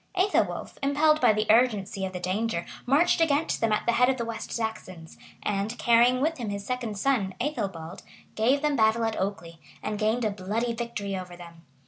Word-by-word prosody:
Ethelwolf, 380 +2 0
impelled 305 +2 +3
by - - +6
the 215 0 0
urgency 215 -4 +2
of - - -8
the 180 - -4
danger, 185 0 -2 0.2
marched 315 +6 +3
against 305 -1 +1
them 225 -1 +2
at 215 - 0
the - - +3
head 250 +2 +3
of 265 - +1
the 235 - -3
West 230 -1 -6
Saxons; 185 -7 -5 0.3
and, 205 +3 -2
carrying 240 +2 +4
with 320 +1 0
him 230 -4 -3
his 200 0 -5
second 240 -5 -3
son, 205 -5 0
Ethelbald, 195 - -4 0.3
gave 260 +7 +2
them 300 -1 +2
battle 220 -1 +3
at 225 -1 -1
Okely, 170 -4 -4 0.2
and 210 -1 -3
gained 220 +2 +1
a 215 - +1
bloody 210 +5 -2
victory 230 -4 -4
over 180 -1 -7
them. 170 -1 -13
220 Hz, 190 wpm, -27 LUFS, 195-250 Hz, 0.3 s, by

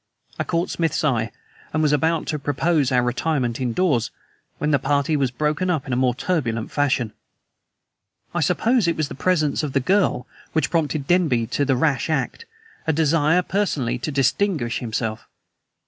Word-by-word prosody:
I - - +1
caught 170 +2 -1
Smith's 165 0 0
eye, 120 -6 +1 0.4
and 155 0 0
was 150 -1 +3
about 160 +2 +1
to 150 - -2
propose 145 0 +1
our 125 -1 +3
retirement 125 -1 -1
indoors, 125 -1 +1 0.5
when 150 - 0
the 145 - +3
party 140 +3 +1
was 140 -3 +1
broken 150 +7 -1
up 160 -6 -1
in 130 - -1
more 125 -2 +2
turbulent 125 -8 -1
fashion. 135 -6 0 1.2
I - - 0
suppose 235 -4 +2
it 170 - +1
was 155 -3 -1
the - - -6
presence 155 -1 +1
of 150 -3 -4
the 140 - +3
girl 185 -3 +1 0.3
which 160 -3 0
prompted 155 -3 0
Denby 155 -9 +2
to 145 - +1
the 135 -1 +2
rash 135 0 +1
act, 155 - -2 0.4
a - - +4
desire 160 +2 +3
personally 140 - -1
to 150 - -3
distinguish 135 - +1
himself. 115 -2 -3
145 Hz, 165 wpm, -22 LUFS, 125-165 Hz, 1.2 s, a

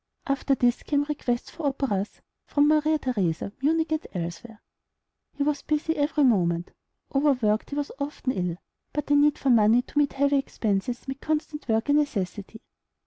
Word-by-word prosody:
After 275 0 +1
this 245 -2 +2
came 285 -1 +1
requests 275 -5 -2
for 315 -4 -3
operas 250 -8 -2 0.3
from 290 0 +3
Maria 310 +1 +3
Theresa, 200 - -1
Munich, 320 +3 +1
and 315 0 -1
elsewhere. 175 +6 -6 0.7
He 285 - -1
was 290 0 0
busy 310 +1 -1
every 295 +1 +1
moment. 175 -8 +2 0.4
Overworked, 255 -7 +2
he 285 - -5
was 290 -1 -2
often 280 -2 -2
ill; 180 -5 -2 0.4
but 295 -1 -2
the 290 - +2
need 290 0 +4
for 270 - +1
money 230 +1 +5
to - - -11
meet 290 -1 +2
heavy 280 0 +2
expenses 230 -2 -2
made 270 +1 -5
constant 305 -1 -2
work 225 +1 +1
a - - +5
necessity. 220 -7 -1
275 Hz, 165 wpm, -26 LUFS, 220-295 Hz, 0.7 s, money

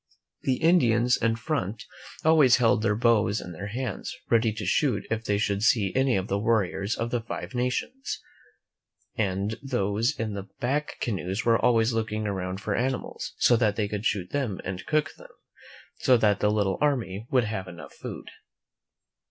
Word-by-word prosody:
The 130 - +1
Indians 125 -7 +4
in 115 0 +1
front 115 - -3 0.4
always 155 -6 +6
held 115 -3 +3
their 105 -2 +1
bows 110 -2 +2
in 90 - -8
their 90 +4 -6
hands, 120 0 -4
ready 115 -1 +4
to 110 0 -5
shoot 145 -5 +1
if 110 0 -1
they 100 - +1
should 100 -1 0
see 105 -3 +3
any 130 -1 +2
of 95 -1 -1
the 100 - 0
warriors 105 -2 0
of 115 +1 -3
the 120 - 0
Five 115 - -6
Nations, 125 - -2 1.0
and 100 +1 -1
those 120 0 0
in 110 -2 -2
the 100 -1 -6
back 145 +5 -1
canoes 95 -2 -2
were 115 -1 +3
always 115 -1 +3
looking 110 -1 -2
around 95 -2 -3
for 105 - -2
animals, 130 +5 -2
so 120 - +5
that 105 -3 +2
they 105 -1 0
could 105 +1 -1
shoot 95 -4 -2
them 130 -9 -2
and 95 -1 -5
cook 155 0 +1
them, - - -13 0.7
so 125 - +5
that 105 -3 +2
the 105 - +2
little 100 -3 0
army 120 -8 0
would 125 -2 +3
have 105 -4 -4
enough 85 -4 -10
food. - - -8
110 Hz, 175 wpm, -26 LUFS, 100-125 Hz, 1.0 s, always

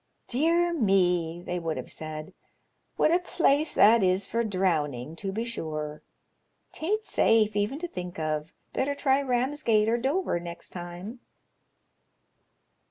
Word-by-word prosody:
' - - -47
Dear 335 +6 +2
me! 180 - +2
' - - -17
they 180 0 -2
would 165 -2 -3
have - - -6
said, 155 -1 -7 0.3
* - - -46
what 310 - +4
a 345 - +4
place 315 -4 +2
that 220 +3 +6
is 185 +1 +2
for 235 +1 -1
drowning, 160 - -1
to 195 +1 -3
be 225 +4 -2
sure! 155 -9 -4 0.7
'Taint 425 +7 -2
safe 215 -2 +3
even 205 +7 0
to 350 +3 -4
think 180 - -7
of. 155 0 -2 0.2
Better 285 +2 0
try 275 -1 +2
Ramsgate 250 -4 +1
or 235 +1 +2
Dover 275 - 0
next 170 0 -7
time.' 180 +7 -8
205 Hz, 150 wpm, -27 LUFS, 175-270 Hz, 0.7 s, that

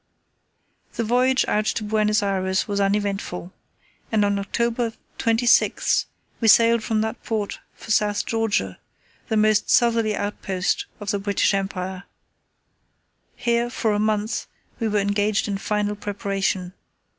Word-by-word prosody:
The 230 - -1
voyage 250 +3 +2
out 210 0 +1
to 215 - -1
Buenos 210 0 +1
Ayres 190 -1 0
was 200 -1 -1
uneventful, 195 -3 -1 0.6
and 215 -2 +3
on 200 0 +1
October 235 +3 -1 0.3
26 230 +2 +3 0.3
we 225 - +1
sailed 230 +1 +6
from 220 -1 0
that 220 +2 -3
port 215 -3 -3 0.2
for 220 - -8
South 210 -2 +2
Georgia, 220 - -1 0.5
the 220 - 0
most 215 0 +3
southerly 230 -3 +3
outpost 195 -2 -2
of 205 -1 -3
the 200 - -1
British 200 0 +1
Empire. 190 -1 -3 1.3
Here, 235 0 0
for 225 -2 -1
a 205 - 0
month, 215 +1 -1 0.3
we 225 - 0
were 210 -1 0
engaged 205 +1 +1
in 200 -1 -2
final 210 0 -1
preparation. 195 -2 -2
210 Hz, 135 wpm, -23 LUFS, 200-225 Hz, 1.3 s, sailed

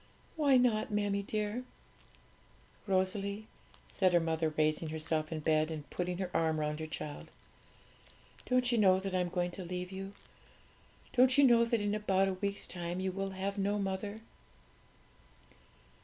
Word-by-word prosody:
'Why 285 -4 +4
not, 235 -4 +2
mammie 205 -1 0
dear?' 210 +4 -2 1.2
'Rosalie,' 195 +2 0 0.5
said 185 -2 +2
her 175 - +6
mother, 160 -1 0
raising 155 +1 +1
herself 155 0 -1
in 160 -1 -3
bed 155 0 +2
and 155 -2 -6
putting 180 0 -2
her 185 -1 -3
arm 160 -1 +1
round 150 0 -2
her 160 - -4
child, 150 -1 -6 1.2
'don't 250 -1 +2
you 235 - +2
know 190 -2 +5
that 190 0 -4
I 185 - +2
am 180 -1 0
going 175 0 -1
to 185 - -7
leave 180 +1 -5
you? 195 +1 -6 1.0
don't 255 +1 +5
you 285 - +7
know 235 -3 +6
that 230 -2 0
in 205 0 0
about 195 -2 +2
a 190 - 0
week's 200 +2 -1
time 175 0 -3
you 190 0 -1
will 195 +1 -3
have 195 +1 -3
no 200 +1 +1
mother?' 200 +2 -3
190 Hz, 160 wpm, -32 LUFS, 170-210 Hz, 1.2 s, you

